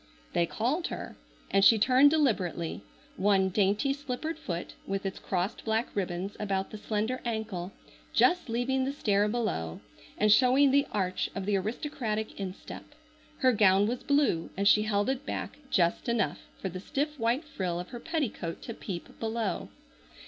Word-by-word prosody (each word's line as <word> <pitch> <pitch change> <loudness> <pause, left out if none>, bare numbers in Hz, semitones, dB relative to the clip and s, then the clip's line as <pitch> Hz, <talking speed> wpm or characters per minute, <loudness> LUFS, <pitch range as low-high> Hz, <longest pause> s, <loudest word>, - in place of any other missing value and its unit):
They 170 - +2
called 265 - -1
her, - - -6 0.4
and 195 - +4
she 225 - +8
turned 255 +6 +6
deliberately, 210 - 0 0.4
one 195 -1 +3
dainty, 205 +7 +2
slippered 285 +3 -4
foot, 175 - -4
with 195 0 -2
its 190 - -3
crossed 185 +2 -2
black 220 +1 -1
ribbons 190 0 -2
about 195 -2 -1
the 215 - -7
slender 220 +5 -1
ankle, 220 -6 -3 0.4
just 360 -7 +3
leaving 250 +3 0
the 270 +1 -1
stair 205 -6 +2
below, 145 - -2 0.4
and 210 0 +4
showing 260 +4 +6
the 280 +1 +3
arch 185 -3 -1
of 195 -1 -3
the 205 0 +1
aristocratic 220 +1 -3
instep. 190 -1 -7 0.5
Her 260 -2 +6
gown 200 -3 +5
was 240 +3 -2
blue 280 - +2
and 200 0 +2
she 210 - +6
held 205 0 +1
it 265 +1 -1
back - - -5
just 175 +4 +1
enough 235 -1 0 0.2
for 190 - -3
the 185 +1 -6
stiff 290 +8 -2
white 235 +7 +1
frill 185 - -3
of 180 - -6
her 240 - -7
petticoat 255 - -3
to 230 - -5
peep 185 -5 -7
below. 225 -2 -2
215 Hz, 165 wpm, -29 LUFS, 195-255 Hz, 0.5 s, she